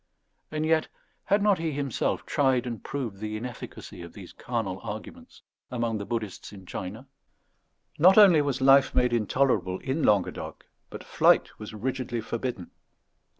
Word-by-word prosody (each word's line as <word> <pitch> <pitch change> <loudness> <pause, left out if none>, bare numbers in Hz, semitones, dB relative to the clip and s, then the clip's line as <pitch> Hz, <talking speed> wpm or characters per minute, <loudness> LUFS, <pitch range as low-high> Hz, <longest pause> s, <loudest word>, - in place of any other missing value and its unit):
And 155 0 -2
yet 160 0 +2 0.4
had 200 +1 +2
not 205 -4 +3
he 165 -2 -2
himself 140 -3 -2
tried 130 -3 +1
and 120 -3 -5
proved 120 -9 -5
the 110 0 -4
inefficacy 120 -5 -8
of 85 -1 -10
these 95 -4 -11
carnal 110 -6 -3
arguments 115 - -9 0.3
among 115 -3 -2
the 100 - -6
Buddhists 110 -6 -4
in 95 -2 -12
China? 100 +8 -7 0.9
Not 185 +6 +7
only 190 -7 +8
was 140 -2 -2
life 135 +1 +5
made 125 -1 +3
intolerable 110 -5 +1
in 135 +8 -3
Languedoc, 105 -8 0 0.2
but - - -9
flight - - +2
was 105 0 -8
rigidly 125 +1 -3
forbidden. 115 -4 -4
120 Hz, 150 wpm, -27 LUFS, 105-140 Hz, 0.9 s, only